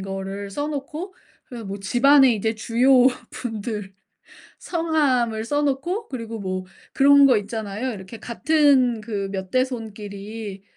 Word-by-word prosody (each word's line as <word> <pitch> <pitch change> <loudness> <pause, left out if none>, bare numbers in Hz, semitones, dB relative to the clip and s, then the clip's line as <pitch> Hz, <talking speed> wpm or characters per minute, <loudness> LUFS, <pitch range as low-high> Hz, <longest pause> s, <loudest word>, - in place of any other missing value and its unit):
거를 195 +1 -5
써 290 +9 -3
놓고 305 +6 -6 0.3
그래서 235 -4 -9
뭐 195 +1 -5
집안에 265 +6 +5
이제 220 +2 -1
주요 250 +4 +4 0.2
분들 215 -4 -5 0.7
성함을 270 -10 0
써 290 +4 0
놓고 295 - -1
그리고 230 -3 -6
뭐 185 -1 -4 0.3
그런 280 0 +6
거 250 -5 +5
있잖아요. 215 +3 -4
이렇게 195 +2 -9
같은 265 -2 +2
그 205 -3 -4
몇 190 -1 -5
대손끼리 215 -4 -4
230 Hz, 255 characters per minute, -23 LUFS, 205-275 Hz, 0.7 s, 그런